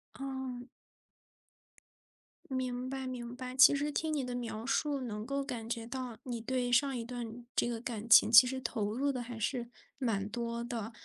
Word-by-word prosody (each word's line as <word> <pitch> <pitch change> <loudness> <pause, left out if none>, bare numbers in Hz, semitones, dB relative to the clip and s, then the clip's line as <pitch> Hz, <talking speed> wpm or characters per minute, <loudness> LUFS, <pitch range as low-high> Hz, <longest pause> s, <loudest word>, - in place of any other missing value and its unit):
哦。 265 -2 -5 1.9
明 255 -1 -2
白 265 -1 -4
明 245 -1 -5
白， 255 0 -7
其 270 +2 +9
实 290 +1 -1
听 315 -1 -1
你 285 -4 -1
的 250 -1 -4
描 230 -2 -4
述 285 0 0
能 215 -4 -5
够 275 +2 -1
感 240 -5 -5
觉 230 -1 -3
到， 250 -3 -5
你 240 -3 -4
对 250 +1 -1
上 270 +2 +3
一 230 - -4
段 240 -1 -6
这 - - +2
个 235 -1 -3
感 230 -1 -5
情 225 - +8
其 230 +2 +10
实 260 +1 -2
投 210 -4 -2
入 280 +4 0
的 255 -3 -2
还 235 -1 -7
是 235 +1 -2 0.3
蛮 220 -7 -1
多 235 +1 -3
的。 235 -2 -4
245 Hz, 195 characters per minute, -32 LUFS, 230-260 Hz, 1.9 s, 其